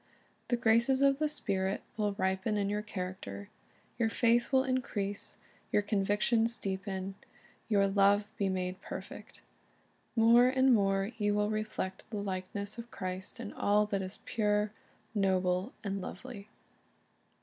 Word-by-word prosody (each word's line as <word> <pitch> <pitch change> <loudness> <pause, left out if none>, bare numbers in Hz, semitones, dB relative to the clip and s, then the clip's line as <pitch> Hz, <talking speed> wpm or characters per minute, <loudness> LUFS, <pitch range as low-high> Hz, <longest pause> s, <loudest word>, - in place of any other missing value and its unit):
The 240 - +1
graces 235 +4 +3
of 275 0 +4
the 305 -1 +1
Spirit 195 -9 -1
will 210 -2 0
ripen 190 +2 0
in 200 0 0
your 210 0 0
character. 180 - -6 0.5
Your 225 -1 +3
faith 235 +2 +2
will 260 -1 +5
increase, 215 -6 -2 0.3
your 205 - +3
convictions 210 +3 +1
deepen, 190 0 -3 0.6
your 200 -2 +4
love 200 +1 +4
be 200 -1 0
made 185 0 -2
perfect. - - -9 0.7
More 235 +2 +6
and 260 0 +4
more 195 -1 +2
you 205 -1 +2
will 210 +1 +1
reflect 215 -3 -3
the 220 - -4
likeness 200 +2 -3
of 235 0 -8
Christ 185 +4 -5
in 225 -3 -6
all 210 +1 +3
that 200 -2 -1
is 190 +1 -7
pure, 210 -1 +1 0.4
noble, 190 0 +1
and 195 -1 -2
lovely. 205 +2 -8
205 Hz, 140 wpm, -32 LUFS, 195-230 Hz, 0.7 s, More